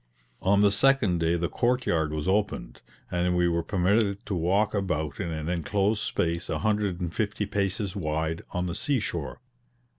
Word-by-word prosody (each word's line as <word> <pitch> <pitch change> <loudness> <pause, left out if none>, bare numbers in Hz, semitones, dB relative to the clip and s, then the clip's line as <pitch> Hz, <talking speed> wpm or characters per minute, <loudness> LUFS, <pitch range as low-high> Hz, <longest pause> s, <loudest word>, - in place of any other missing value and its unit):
On 100 +2 +3
the 100 -1 +5
second 105 -5 +3
day 80 +1 +2
the 85 0 0
court 125 +4 0
yard 80 -6 +1
was 75 +2 -3
opened, 95 - -1 0.3
and 90 0 +1
we 90 0 +3
were 85 0 +1
permitted 100 +3 +1
to 100 - -3
walk 95 +5 +1
about 80 -8 -2
in 85 - -2
an 80 -1 -4
inclosed 100 +5 0
space 85 +1 -1
a - - 0
hundred 105 -4 0
and 85 -3 -3
fifty 105 -1 -1
paces 100 0 -1
wide, 80 -2 -2
on 90 0 -2
the 85 - -3
sea 135 - 0
shore. 85 - -4
95 Hz, 180 wpm, -27 LUFS, 85-105 Hz, 0.3 s, the